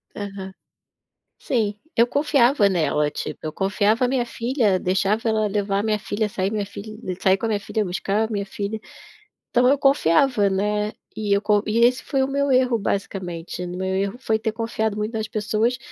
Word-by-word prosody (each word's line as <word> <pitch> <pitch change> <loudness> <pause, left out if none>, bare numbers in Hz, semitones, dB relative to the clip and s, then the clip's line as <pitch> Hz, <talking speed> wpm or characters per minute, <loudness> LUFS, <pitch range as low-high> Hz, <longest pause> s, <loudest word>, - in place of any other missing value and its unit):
Aham. 195 -2 -6 0.9
Sim, 215 -5 0 0.2
eu 235 +1 +5
confiava 275 -5 +3
nela, 155 -5 +1
tipo, - - -5
eu 155 -1 -4
confiava 205 +6 +1
a - - +2
minha 250 -2 +1
filha, 230 -4 0
deixava 195 +5 +1
ela 215 -1 +1
levar 200 -1 0
a - - -1
minha 215 -1 0
filha, 210 +1 -2
sair 195 -1 -2
minha 210 -2 -1
filha 205 +2 -9 0.2
sair 190 0 +4
com 225 - -3
a - - -1
minha 210 - +1
filha, 215 +1 -2
buscar 200 +4 -1
a - - -7
minha 200 -1 -2
filha. 205 +2 -4 0.7
Então 250 0 +3
eu 280 +2 +4
confiava, 250 - +3
né. 210 +2 0 0.2
E 210 -2 0
eu 200 - +1
co 210 -1 +2
e 220 +2 +1
esse 245 +2 +4
foi 270 -2 0
o - - 0
meu 280 0 0
erro 255 -2 +3
basicamente, 180 -4 -3
o - - -4
meu 190 0 -2
erro 200 +4 -1
foi 220 -4 0
ter 220 0 -1
confiado 220 -2 -2
muito 210 +2 -3
nas 220 -1 -2
pessoas, 220 +2 0
215 Hz, 195 wpm, -23 LUFS, 200-235 Hz, 0.9 s, eu